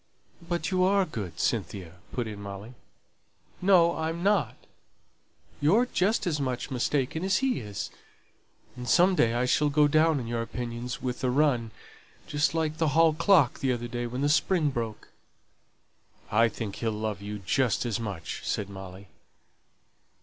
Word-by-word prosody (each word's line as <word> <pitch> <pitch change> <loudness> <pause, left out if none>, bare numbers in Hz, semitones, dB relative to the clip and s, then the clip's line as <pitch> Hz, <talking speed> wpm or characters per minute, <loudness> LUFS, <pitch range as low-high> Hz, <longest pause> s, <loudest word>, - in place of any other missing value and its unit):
"But 170 -2 -3
you 185 -1 +2
are 195 +1 +3
good, 95 - -6
Cynthia," 90 -5 -2
put 120 - -2
in 105 -2 -7
Molly. 100 +4 -8 0.9
"No, 180 -3 +5
I'm 165 +2 -3
not. 205 0 +2 1.0
You're 200 +12 +4
just 210 -2 0
as 155 -5 -1
much 130 +1 -3
mistaken 135 +5 -1
as 190 0 +2
he 265 -2 0
is; 105 -3 -6 0.8
and 125 -1 -6
some 185 +2 +5
day 115 -9 +2
I 125 +1 +1
shall 150 +3 +2
go 150 +1 +4
down 155 0 +3
in 120 - -5
your 115 0 -2
opinions 120 +1 -5
with 125 0 -3
a 130 - +2
run, 125 -4 +2 0.6
just 145 +1 0
like 155 -1 -1
the 160 -2 +1
hall 165 -1 +6
clock 165 - +3
the 135 - +1
other 120 -1 -2
day 120 0 -3
when 125 +3 -4
the 145 - +2
spring 155 -1 +2
broke." 115 -4 -5 1.2
"I 115 +2 +4
think 110 -2 -6
he'll 115 -1 -1
love 105 -1 -3
you 105 +1 -5
just 115 +5 0
as 120 -1 -1
much," 100 -8 -5
said 100 -1 -2
Molly. 95 0 -10
125 Hz, 160 wpm, -28 LUFS, 115-160 Hz, 1.2 s, hall